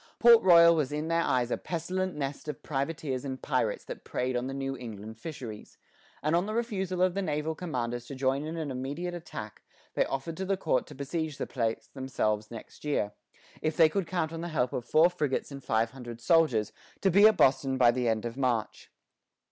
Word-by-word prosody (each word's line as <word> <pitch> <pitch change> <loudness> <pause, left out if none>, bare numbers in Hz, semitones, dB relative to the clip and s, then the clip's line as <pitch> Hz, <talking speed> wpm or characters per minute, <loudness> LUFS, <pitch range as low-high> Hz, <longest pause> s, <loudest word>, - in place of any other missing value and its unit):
Port 235 -1 +8
Royal 170 -2 +7
was 150 -4 0
in 150 +2 -2
their 165 0 +2
eyes 125 -5 +1
a - - +1
pestilent 180 +2 -2
nest 140 0 -4
of 150 - -6
privateers 140 -2 -2
and 130 -2 -4
pirates - - -1
that - - -8
preyed 125 0 -2
on 125 +1 -1
the 135 - -4
New 135 0 -3
England 110 -3 -8
fisheries; 120 -8 -8 0.5
and 155 +2 +2
on 175 +4 +1
the 215 - -3
refusal 190 -6 -1
of 185 -1 +3
the 200 - -1
naval 155 -2 -1
commanders 120 -8 -4
to 140 - -7
join 135 +1 0
in 160 +2 -5
an 155 -4 -3
immediate 140 +8 -4
attack, 160 -11 -7 0.3
they - - +3
offered 135 +5 -3
to 190 - -2
the 195 0 0
court 130 -8 0
to 150 - -11
besiege 150 +2 -3
the - - -2
place 115 -3 -2
themselves 110 -6 -1
next 115 - -11
year, 140 -9 0 0.5
if 155 0 -1
they 160 -2 +7
could 190 +1 -1
count 165 -2 -1
on 165 - -5
the 170 - -3
help 130 -7 0
of 120 - -3
four 160 +6 +5
frigates 150 -6 -2
and 140 -1 -8
five 110 0 +1
hundred 120 -3 -9
soldiers, 155 - +3 0.3
to 195 - +2
be 200 +4 +8
at 220 -3 +3
Boston 135 0 +3
by 120 -2 +6
the 125 -1 0
end 110 0 0
of 120 0 -4
March. 125 -5 -1
145 Hz, 210 wpm, -29 LUFS, 125-170 Hz, 0.5 s, Port